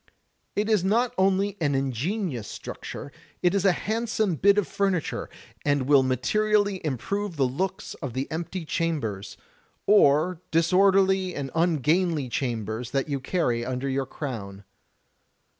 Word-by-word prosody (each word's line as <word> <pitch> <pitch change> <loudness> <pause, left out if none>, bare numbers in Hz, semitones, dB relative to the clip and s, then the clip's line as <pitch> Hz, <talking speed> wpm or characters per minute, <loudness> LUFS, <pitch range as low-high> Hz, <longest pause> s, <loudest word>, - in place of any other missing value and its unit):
It 210 +1 0
is 215 -5 +2
not 230 +5 +2
only 195 +1 +2
an 145 -3 +1
ingenious 135 - -2
structure, - - -7 0.3
it 175 0 +4
is 200 -1 +1
a 195 - +6
handsome 220 0 -1
bit 200 +6 +4
of 205 - +2
furniture, 195 -5 -1 0.3
and 145 -2 +2
will 140 +1 +5
materially 200 - +1
improve 175 - -2
the 140 -3 +2
looks 185 +9 -3
of 130 -4 -4
the 130 +2 -2
empty 170 +2 -4
chambers, 140 - -2 0.5
or 175 -3 +4
disorderly 190 +2 +3
or 135 -2 -4
ungainly 165 -2 +1
chambers 115 -2 -3
that 135 +1 -1
you 140 -1 -1
carry 130 -5 0
imder 130 +2 -2
your 135 -1 -1
crown. 105 -10 -6
165 Hz, 135 wpm, -26 LUFS, 135-195 Hz, 0.5 s, a